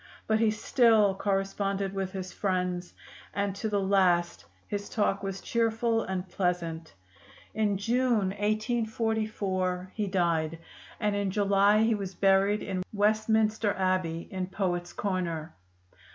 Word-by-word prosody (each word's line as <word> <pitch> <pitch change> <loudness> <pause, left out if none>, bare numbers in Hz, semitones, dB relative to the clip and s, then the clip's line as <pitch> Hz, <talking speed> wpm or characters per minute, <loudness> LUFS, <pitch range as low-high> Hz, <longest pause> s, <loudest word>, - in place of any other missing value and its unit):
But 220 0 +2
he 225 -1 +4
still 220 -2 +3
corresponded 195 0 -1
with 195 -1 -3
his 185 -2 -6
friends, 180 -2 -2 0.4
and 200 -1 0
to 220 - -2
the 205 -1 +1
last 180 - +2 0.2
his 205 0 -4
talk 205 -2 0
was 195 -1 -4
cheerful 230 0 +1
and 190 -2 -3
pleasant. 170 - -2 0.6
In 210 -2 +1
June, 230 -1 +1
1844, 215 -4 -1
he 210 -2 -2
died, 165 -4 0 0.4
and 210 -2 0
in 200 -1 0
July 200 +2 +3
he 225 +1 +3
was 195 -3 -4
buried 195 +2 +3
in 190 -2 -3
Westminster 215 0 +2
Abbey 185 -3 -1
in 185 -1 -3
Poets' 180 -2 -2
Corner. 175 -5 -3
195 Hz, 125 wpm, -28 LUFS, 185-215 Hz, 0.6 s, he